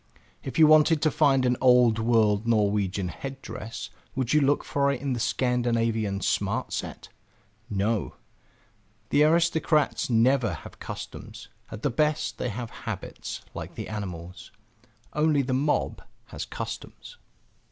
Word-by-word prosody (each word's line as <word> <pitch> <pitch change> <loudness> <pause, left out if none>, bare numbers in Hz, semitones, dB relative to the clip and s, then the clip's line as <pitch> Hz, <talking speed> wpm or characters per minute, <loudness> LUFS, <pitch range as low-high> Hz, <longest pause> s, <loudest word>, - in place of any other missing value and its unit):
If 135 - -6
you 160 - +8
wanted 155 +1 +6
to 155 - +3
find 135 -3 +3
an 125 -1 +2
old 125 -3 +5
world 110 -2 +2
Norwegian 100 -4 +1
head 135 +10 -7
dress, 115 +2 -7 0.2
would 130 -1 0
you 150 - +5
look 145 +1 +2
for 140 0 +1
it 140 - -3
in 140 -1 -2
the 120 - -3
Scandinavian 115 -5 0
Smart - - -1
Set? - - -5 0.6
No; 105 0 -1 0.9
the 145 - +4
aristocrats 160 -2 +2
never 115 -3 +3
have - - -12
customs; - - -8 0.2
at 110 - -9
the 145 - +1
best 150 +4 0
they 125 - -1
have 115 +1 -5 0.2
habits, - - -5
like - - -7
the - - -6
animals. 90 -4 -7 0.6
Only 150 -2 +2
the 130 0 -2
mob 145 +3 0 0.3
has - - -5
customs. 485 - -7
125 Hz, 140 wpm, -26 LUFS, 110-145 Hz, 0.9 s, you